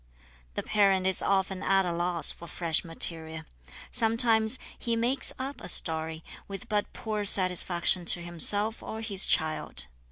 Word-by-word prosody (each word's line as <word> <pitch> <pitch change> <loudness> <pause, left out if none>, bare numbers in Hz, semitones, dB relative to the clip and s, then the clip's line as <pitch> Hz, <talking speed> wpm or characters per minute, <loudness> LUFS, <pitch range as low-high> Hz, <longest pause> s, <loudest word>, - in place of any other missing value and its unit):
The - - -5
parent 195 -3 0
is 190 0 -1
often 190 -1 -2
at 195 0 0
a 175 - -4
loss 175 0 +2
for 170 - -13
fresh 165 -2 0
material. 160 -1 -5 0.5
Sometimes 225 0 +2 0.2
he 235 -2 -3
"makes 245 +4 +3
up" 270 +2 -8
a - - -10
story, 160 -1 +1 0.2
with 195 -1 -9
but 210 -1 -3
poor 215 -3 -6
satisfaction 180 -2 +3
to 175 - +2
himself 205 +6 +1
or 220 - -9
his 200 -3 -2
child. 155 - -2
190 Hz, 150 wpm, -26 LUFS, 170-220 Hz, 0.5 s, makes